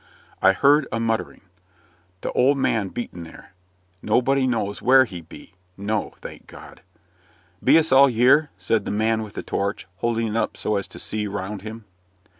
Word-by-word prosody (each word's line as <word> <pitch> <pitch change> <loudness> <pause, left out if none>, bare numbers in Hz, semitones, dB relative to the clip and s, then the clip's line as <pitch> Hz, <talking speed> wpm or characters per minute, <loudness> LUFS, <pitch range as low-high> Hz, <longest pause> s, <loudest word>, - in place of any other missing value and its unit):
I 95 0 +5
heard 140 +7 +3
a 115 - -2
muttering 115 -1 -2 0.8
"Th' - - -2
old 140 +3 +3
man 110 -7 0
bean't 90 -7 -6
there." 80 +3 -14 0.5
"Nobody 130 +4 +2
knows 105 -5 -2
where 130 +1 +6
he 90 -7 -9
be." 80 - -14 0.2
No, 105 +2 -3
thank - - -10
God! - - -13 0.8
"Be - - +6
us 160 -2 +2
all 135 +1 +7
y'ere?" 130 +6 +4
said 110 -3 -1
the - - -4
man 110 +2 0
with 105 -2 -8
the - - -5
torch, 100 +1 -3
holding 115 +2 -1
it 105 - -4
up 115 - -1
so 105 - -1
as 100 - -4
to - - -12
see 105 -1 -3
round 100 0 -5
him. 110 +1 -9
110 Hz, 175 wpm, -23 LUFS, 100-130 Hz, 0.8 s, all